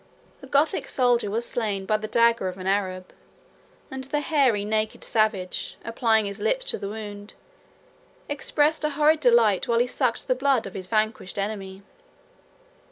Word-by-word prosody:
A 270 - -11
Gothic 285 +4 +1
soldier 245 -4 +1
was 230 +3 -2
slain 205 -5 -2
by 215 - +1
the 215 0 -6
dagger 230 -3 +3
of 185 0 -5
an 185 - -8
Arab; 190 -2 -1 0.8
and 265 0 -5
the 295 +2 -1
hairy, 265 -9 +2
naked 215 0 -1
savage, 215 -5 -1
applying 225 -2 +2
his 200 +1 -5
lips - - 0
to - - -4
the 200 - -5
wound, 205 -1 -8 0.9
expressed 295 +2 +1
a 300 - +1
horrid 305 +2 +3
delight, 235 -7 +3
while 235 - +2
he 240 - +3
sucked 250 -1 -1
the - - +3
blood 265 -2 +1
of 195 - -8
his 185 -1 -6
vanquished 215 -2 -1
enemy. 195 -1 -4
220 Hz, 165 wpm, -25 LUFS, 200-260 Hz, 0.9 s, dagger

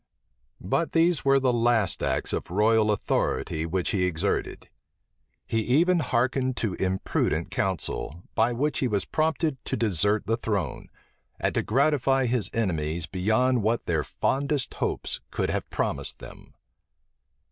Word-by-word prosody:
But 160 - -1
these 165 0 +3
were 135 -1 +4
the 130 -2 +2
last 115 -4 +2
acts - - -1
of - - -3
royal 110 +3 +3
authority 80 -5 -1
which 90 +1 -1
he 95 -3 +1
exerted. 85 -3 -2 0.8
He 115 - 0
even 165 - +3
hearkened 130 -1 0
to 110 -5 -1
imprudent 95 0 -1
counsel, 90 -3 -3
by 115 +2 +2
which 145 +5 0
he 130 - +1
was 100 -5 0
prompted 155 -3 -1
to - - -2
desert 105 -1 +1
the 115 +3 0
throne, 100 - -3 0.5
and - - 0
to - - +1
gratify 135 +1 +2
his 120 -3 0
enemies 85 -6 -1
beyond 110 +8 +1
what 110 +3 0
their 80 -3 0
fondest 140 - -1
hopes - - -1
could - - -1
have - - -3
promised - - -2
them. - - -13
115 Hz, 140 wpm, -26 LUFS, 95-135 Hz, 0.8 s, were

